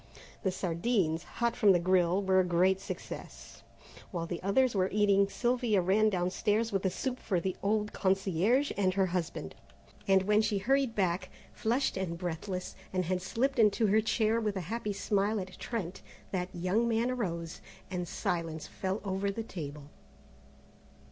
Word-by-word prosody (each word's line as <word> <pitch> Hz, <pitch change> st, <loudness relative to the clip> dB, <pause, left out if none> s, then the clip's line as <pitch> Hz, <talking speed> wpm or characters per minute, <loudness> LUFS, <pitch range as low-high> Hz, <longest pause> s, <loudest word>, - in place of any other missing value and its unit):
The 195 Hz, -, +1 dB
sardines, 175 Hz, -2 st, 0 dB
hot 235 Hz, +6 st, -2 dB
from 205 Hz, -4 st, +5 dB
the 175 Hz, -, +3 dB
grille, 180 Hz, +1 st, +2 dB
were 190 Hz, 0 st, +4 dB
a -, -, +5 dB
great 180 Hz, +2 st, +3 dB
success. -, -, -8 dB, 0.5 s
While 170 Hz, -2 st, -3 dB
the 170 Hz, 0 st, -5 dB
others 240 Hz, +6 st, +2 dB
were 190 Hz, -2 st, +1 dB
eating 200 Hz, -1 st, +3 dB
Sylvia 240 Hz, -2 st, +1 dB
ran 200 Hz, +4 st, +3 dB
downstairs 210 Hz, +4 st, 0 dB
with 195 Hz, -2 st, 0 dB
the 190 Hz, -, +1 dB
soup 255 Hz, +6 st, -3 dB
for 185 Hz, -4 st, 0 dB
the 185 Hz, +2 st, -2 dB
old 210 Hz, +1 st, 0 dB
concierge 195 Hz, -, +2 dB
and 185 Hz, -2 st, +1 dB
her 195 Hz, -1 st, +3 dB
husband, 175 Hz, -, -3 dB, 0.5 s
and 190 Hz, -1 st, +5 dB
when 210 Hz, +2 st, +4 dB
she 215 Hz, -1 st, 0 dB
hurried 260 Hz, +3 st, +1 dB
back, 185 Hz, -1 st, 0 dB, 0.2 s
flushed 240 Hz, 0 st, 0 dB
and 175 Hz, -3 st, -2 dB
breathless, 180 Hz, +2 st, -4 dB, 0.2 s
and 185 Hz, -1 st, 0 dB
had 180 Hz, +1 st, -1 dB
slipped 250 Hz, +8 st, -1 dB
into 220 Hz, +1 st, +4 dB
her 215 Hz, +2 st, +4 dB
chair 220 Hz, +1 st, +1 dB
with 210 Hz, -2 st, -1 dB
a 190 Hz, -, -2 dB
happy 230 Hz, -3 st, -2 dB
smile 205 Hz, +1 st, 0 dB
at 185 Hz, -1 st, -8 dB
Trent, 195 Hz, -7 st, -4 dB, 0.3 s
that 180 Hz, -1 st, -2 dB
young 185 Hz, +7 st, 0 dB
man 230 Hz, +2 st, +1 dB
arose, 170 Hz, -9 st, -3 dB, 0.3 s
and 180 Hz, -1 st, -3 dB
silence 165 Hz, -4 st, -2 dB
fell 190 Hz, +2 st, -3 dB
over 195 Hz, +1 st, -1 dB
the 225 Hz, +3 st, -3 dB
table. 150 Hz, -8 st, -7 dB
195 Hz, 165 wpm, -31 LUFS, 180-220 Hz, 0.5 s, from